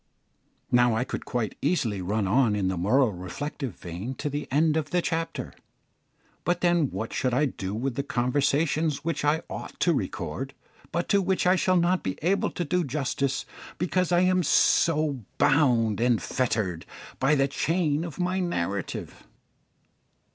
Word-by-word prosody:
Now 120 -2 +4
I 115 - +1
could - - -5
quite 120 -6 -2
easily 120 - 0
run 100 +2 -1
on 110 +1 +3
in 95 -2 0
the 95 - -1
moral 110 +8 +3
reflective 110 - -5
vein 90 +10 -6
to 145 +1 -3
the 145 +1 -3
end 155 +3 +3
of 155 -1 -1
the 180 - +1
chapter, 165 -1 -3 0.9
but 175 +1 0
then 175 -5 +3
what 110 - -5
should 125 -1 0
I 145 +4 +3
do 95 -7 -4
with 130 +4 -2
the 140 - -1
conversations 140 +4 0
which 165 -4 -1
I 150 +2 +2
ought - - -8
to 175 - +4
record, 110 - -4 0.4
but 170 +1 -1
to 200 - +4
which 190 0 0
I 180 +1 +5
shall 185 0 +2
not 175 +2 +2
be 95 - -3
able 195 +4 +2
to 175 - -4
do 180 +4 +1
justice, 135 -1 -1 0.3
because 180 +1 0
I 175 0 +4
am 185 0 +3
so 155 -2 +3 0.2
bound 125 -8 +3
and 120 -2 +3
fettered 105 -9 -1 0.3
by 135 +3 +3
the 135 -1 +3
chain 155 +1 0
of 170 -3 -7
my 180 +1 0
narrative? 100 - -3
140 Hz, 165 wpm, -26 LUFS, 115-165 Hz, 0.9 s, I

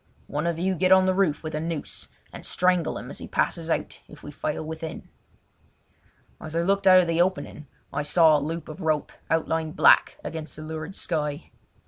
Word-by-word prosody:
"One 150 +3 -2
of 170 -1 -1
you 185 +3 0
get 185 +1 +1
on 190 0 +7
the 185 - +2
roof 185 -6 +1
with 155 - -5
a 155 - -1
noose 165 -1 -4 0.3
and - - -9
strangle 180 -2 +1
him - - -8
as - - -7
he - - -7
passes 165 -1 -1
out - - -2
if 150 - -15
we 145 - -8
fail 150 +1 -3
within." 160 0 -7 1.3
As 155 +1 -8
I 170 - +2
looked 195 +1 +1
out 185 0 +8
of 175 - -2
the 165 +1 +2
opening 175 -4 -2 0.3
I - - -1
saw 155 0 +5
the - - -4
loop 165 +2 -4
of 155 +4 -9
a - - -5
rope 155 -2 0 0.2
outlined 160 -1 0
black - - +5
against 160 -1 -6
the 155 - -8
lurid 160 +3 -6
sky. 150 -3 -3
160 Hz, 205 wpm, -25 LUFS, 155-180 Hz, 1.3 s, out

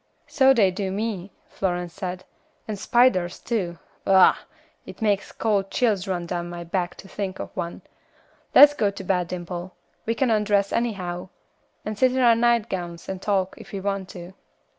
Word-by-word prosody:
"So 270 -2 +4
they 210 -8 +4
do 190 0 -3
me," 200 -2 -3 0.2
Florence 175 -2 -3
said, 185 0 -5 0.4
"and 210 -2 -4
spiders 190 -7 +3
too. 185 -8 -3 0.3
Ugh! 190 -1 +7 0.5
it - - -11
makes 205 -3 0
cold 200 -3 0
chills 210 -7 +1
run 180 -2 -2
down 175 0 -4
my 175 0 -6
back 175 +1 -2
to 195 - -13
think 195 -1 -4
of - - -8
one; 170 -2 -5 0.7
let's 290 0 +10
go 215 -7 +1
to 200 0 -8
bed, 180 -2 0
Dimple. 175 +1 -6 0.3
We 230 - +1
can 250 0 +1
undress 205 -2 +2
anyhow, 185 -6 -2 0.6
and 215 -1 -4
sit 255 -1 +4
in 260 - 0
our 235 -2 +6
nightgowns 210 -8 0
and 190 -1 -5
talk, 195 -2 0
if - - -12
we 200 - -3
want 195 -1 -3
to." 175 0 -10
195 Hz, 170 wpm, -24 LUFS, 180-215 Hz, 0.7 s, let's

